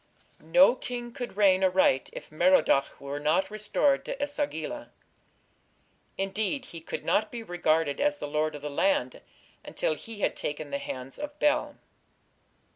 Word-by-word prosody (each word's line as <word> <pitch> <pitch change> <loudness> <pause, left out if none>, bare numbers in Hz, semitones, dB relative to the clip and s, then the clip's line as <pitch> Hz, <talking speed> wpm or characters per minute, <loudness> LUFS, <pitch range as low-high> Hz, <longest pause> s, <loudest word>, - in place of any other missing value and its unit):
No 240 - +6
king 245 -2 -6
could 245 -5 -7
reign 190 -2 +5
aright 185 -8 +3
if - - -10
Merodach 155 -4 +3
were 140 +1 -5
not 165 +7 +1
restored 215 +6 +1
to - - -3
E 285 - +1
sagila. 290 - -4 1.3
Indeed 205 +7 -1
he 165 -8 -10
could - - -6
not 215 0 +1
be 235 -1 -6
regarded 165 -6 0
as 295 0 +2
the - - -5
lord 155 +1 -1
of 145 - -9
the 150 - -3
land 290 - +1 0.4
until - - -1
he 225 - -9
had - - +1
"taken 150 0 -5
the 140 - -1
hands 130 0 -7
of 295 0 -6
Bel". 295 -1 +1
195 Hz, 155 wpm, -28 LUFS, -, 1.3 s, No